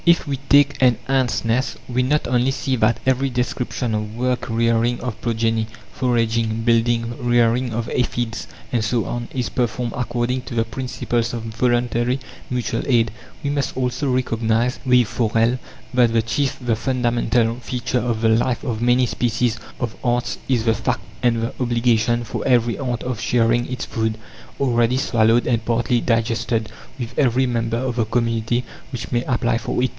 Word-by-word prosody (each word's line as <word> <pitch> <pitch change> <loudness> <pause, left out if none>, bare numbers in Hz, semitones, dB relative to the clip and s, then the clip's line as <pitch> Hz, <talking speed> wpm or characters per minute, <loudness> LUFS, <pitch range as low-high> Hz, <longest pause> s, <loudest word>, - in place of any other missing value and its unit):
(6) 170 0 +7
If - - -14
we 140 -1 -1
take 140 0 +5
an 125 -2 +5
ants' 130 -4 +1
nest, 120 +4 0
we 125 0 0
not 150 +4 +1
only 125 +1 +2
see 135 -1 -1
that 115 +1 +2
every 130 +1 +2
description 125 -1 -2
of 105 0 -3
work 125 0 -1
rearing 115 +1 +2
of 115 -3 -5
progeny, 115 -1 0 0.3
foraging, 115 -2 0
building, 115 0 +2
rearing 120 0 +2
of 115 +1 -2
aphides, 120 -2 -1 0.2
and 115 -3 +1
so 115 +1 0
on 120 -1 -4
is 125 -4 -2
performed 120 -1 -1
according 125 +1 -1
to 125 - -8
the 115 - +3
principles 120 0 -2
of 115 - -5
voluntary 120 +2 0 0.3
mutual 120 -2 -1
aid; 115 -4 +3 0.3
we 140 - 0
must 140 -2 -2
also 130 +2 0
recognize, 115 -1 0
with 125 -2 +5
Forel, 115 +2 +1 0.3
that 120 -2 +4
the 115 -1 +3
chief, 135 +4 -1
the 120 -3 0
fundamental 120 -1 +1
feature 125 +1 -2
of 120 -2 -1
the 115 - +3
life 120 +2 +1
of 115 -2 -3
many 125 +1 +4
species 115 -1 0 0.2
of 120 -3 -3
ants 120 0 0
is 120 -4 +2
the 115 - +4
fact 110 - -1 0.2
and 115 -2 +2
the 115 - -2
obligation 120 -1 +2
for - - -4
every 120 -2 +3
ant 125 -4 -2
of 125 -3 -3
sharing 120 0 +2
its 125 - -3
food, 110 -1 -1 0.4
already 120 -2 +2
swallowed 115 -2 +3
and 115 -2 +1
partly 120 +1 +1
digested, 115 -1 0 0.3
with 120 -2 -5
every 130 -2 +3
member 115 -2 -1
of 125 0 -2
the 115 - +2
community 115 +1 0 0.3
which 120 -3 -6
may 120 0 +1
apply 120 -2 +1
for 125 - -1
it. 130 - +2
120 Hz, 170 wpm, -21 LUFS, 115-125 Hz, 0.4 s, 6